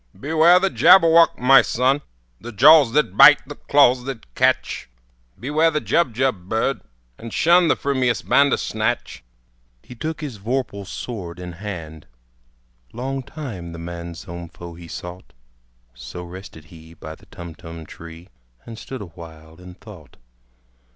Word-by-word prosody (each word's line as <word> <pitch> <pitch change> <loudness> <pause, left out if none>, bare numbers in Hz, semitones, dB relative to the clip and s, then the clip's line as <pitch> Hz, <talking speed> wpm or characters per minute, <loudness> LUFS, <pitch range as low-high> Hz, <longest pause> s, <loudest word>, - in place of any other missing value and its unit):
"Beware 160 +5 +4
the 195 0 0
Jabberwock, 165 -1 +5
my 135 +1 +6
son! 130 +4 0 0.4
The 120 - -9
jaws 140 +3 +6
that 150 +1 +1
bite, 150 -1 +7
the 145 - -7
claws 130 -4 +2
that 120 - -8
catch! - - 0 0.5
Beware 150 +5 +1
the 155 -1 -1
Jubjub 125 - -1
bird, 115 +5 -1 0.4
and 115 - -9
shun 170 +6 +3
The - - +3
frumious 130 -4 -1
Bandersnatch!" 120 -4 0 0.6
He - - -12
took 155 +6 -6
his 135 -9 -7
vorpal 110 -3 -4
sword 95 -7 -7
in 90 0 -7
hand: 85 -5 -9 0.9
Long 135 +3 -4
time 110 - -8
the - - -9
manxome 85 0 -8
foe 85 +1 -11
he 85 0 -12
sought. 90 +2 -10 0.6
So 65 +8 -9
rested 90 -3 -12
he 80 0 -15
by 80 -1 -9
the - - -19
Tumtum 85 -1 -11
tree, 85 +3 -13 0.4
And 115 -1 -10
stood 130 -3 -8
awhile 80 -3 -13
in 90 0 -13
thought. 95 -6 -15
110 Hz, 135 wpm, -21 LUFS, 85-140 Hz, 0.9 s, bite